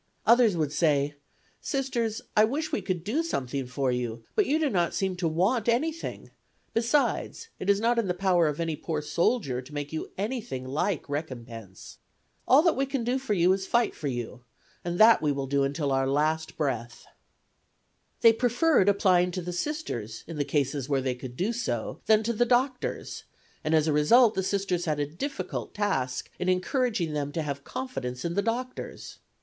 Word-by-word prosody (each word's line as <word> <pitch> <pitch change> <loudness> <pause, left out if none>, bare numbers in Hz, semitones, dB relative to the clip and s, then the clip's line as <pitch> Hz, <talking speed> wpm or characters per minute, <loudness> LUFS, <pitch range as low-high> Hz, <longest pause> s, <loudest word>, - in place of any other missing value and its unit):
Others 235 -6 +5
would 155 -3 0
say: 145 -3 +2 0.5
"Sisters, 250 -6 -2
I 215 - +6
wish 300 +8 -1
we 300 - -1
could 180 -4 -3
do 240 - 0
something 135 - -3
for 130 +1 -1
you, 120 -2 -3
but 420 - +2
you 300 - +2
do 315 -1 +1
not 175 -9 0
seem 190 -1 0
to 175 -2 0
want 195 +9 +1
anything; 310 +8 -2 0.4
besides, 285 - 0
it 185 - -3
is 200 0 +4
not 235 +2 +2
in 225 - 0
the 180 - 0
power 180 -3 +3
of 150 0 -2
any 165 -2 -1
poor 155 0 -3
soldier 150 - 0
to 130 +4 -14
make 145 +1 -4
you 160 - -4
anything 210 - -3
like 150 +5 -1
recompense. 120 - -7 0.5
All 280 +4 +6
that 340 - +3
we 270 +1 0
can 270 -3 -2
do 250 +3 0
for 255 -6 -1
you 180 +1 +4
is 190 0 -2
to - - -14
fight 235 -1 +2
for 150 - -5
you, 120 -1 -5 0.4
and 175 0 -3
that 225 +3 +7
we 150 -2 +2
will 140 -1 -2
do 140 +1 +1
until 140 +1 -1
our 135 0 +2
last 155 +3 0
breath." 120 -6 -3 1.2
They 230 -1 +8
preferred 245 - +3
applying 185 -3 +3
to 185 - -3
the 180 +1 -4
Sisters 175 - -4
in 155 -3 -3
cases 140 -1 -1
where 135 -2 +2
they 130 -1 -1
could 125 0 -9
do 205 +6 0
so 235 +1 -3
than 220 0 +5
to 235 +2 0
the 235 - +2
doctors, 255 +1 -1 0.4
and 155 +1 +2
as 155 -1 +3
a 155 - +2
result 220 +11 +5
the 190 - 0
Sisters 190 -2 -1
had 155 -3 -1
a 145 - +1
difficult 270 - -5
task 135 -12 -1
in 180 - 0
encouraging 185 - 0
them 145 -1 -2
to 160 - -1
have 140 -1 -4
confidence 130 - -5
in 170 - -1
the 200 - +1
doctors. 245 +4 -4
175 Hz, 190 wpm, -27 LUFS, 145-235 Hz, 1.2 s, They